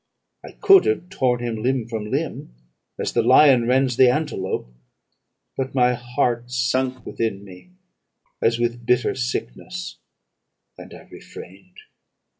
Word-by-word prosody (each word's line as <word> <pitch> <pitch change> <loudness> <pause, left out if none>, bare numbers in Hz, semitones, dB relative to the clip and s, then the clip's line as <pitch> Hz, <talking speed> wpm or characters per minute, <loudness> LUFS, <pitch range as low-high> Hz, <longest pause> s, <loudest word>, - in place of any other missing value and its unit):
I - - -11
could 390 -1 +5
have 430 - -1
torn 130 -10 0
him 120 -2 -3
limb 125 -1 -1
from 110 -2 -5
limb, - - -4 0.4
as - - -3
the - - +2
lion 125 0 +5
rends 130 -1 +1
the 130 -1 +6
antelope. 125 - -3 0.8
But 135 0 -4
my 125 -1 +3
heart 120 0 -2
sunk 125 0 -1
within 105 -4 -3
me 95 - -15 0.7
as 115 0 +2
with 120 0 -2
bitter 125 0 +2
sickness, 130 +9 -5 0.8
and - - -13
I - - -13
refrained. 455 +2 -13
125 Hz, 130 wpm, -22 LUFS, 115-130 Hz, 0.8 s, the